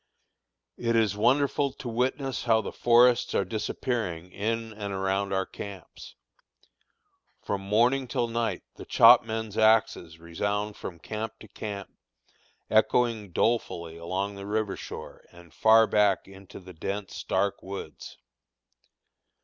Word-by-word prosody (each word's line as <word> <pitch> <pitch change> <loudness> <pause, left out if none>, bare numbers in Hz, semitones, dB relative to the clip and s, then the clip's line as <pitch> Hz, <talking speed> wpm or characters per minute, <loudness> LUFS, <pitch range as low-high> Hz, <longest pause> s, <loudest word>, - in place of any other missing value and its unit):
It 115 -1 0
is 110 -3 +2
wonderful 140 +4 +2
to 130 - -9
witness 130 +3 -2
how 115 -2 +4
the - - -6
forests 120 +1 +4
are 100 - +2
disappearing 105 -4 -3
in 115 +3 -3
and 100 -1 -5
around 95 +1 -1
our 95 0 0
camps. 100 0 -10 1.3
From 100 -1 -2
morning 120 +7 +2
till 120 -1 -1
night 115 -1 -2
the - - -9
chopmen's 110 -2 +4
axes 110 -7 +2
resound 100 +5 -3
from 85 - -8
camp 110 +6 -6
to 110 - -11
camp, 100 0 -7 0.8
echoing 110 -1 +2
dolefully 85 -6 -1
along 95 +4 -3
the 100 0 -8
river 105 -1 -1
shore - - -9
and 85 -3 -16
far 110 +7 +6
back 105 -3 +2
into 95 -1 -12
the 90 -1 -12
dense, 100 +4 -5
dark 100 +1 0
woods. 95 +1 -8
105 Hz, 125 wpm, -27 LUFS, 95-115 Hz, 1.3 s, far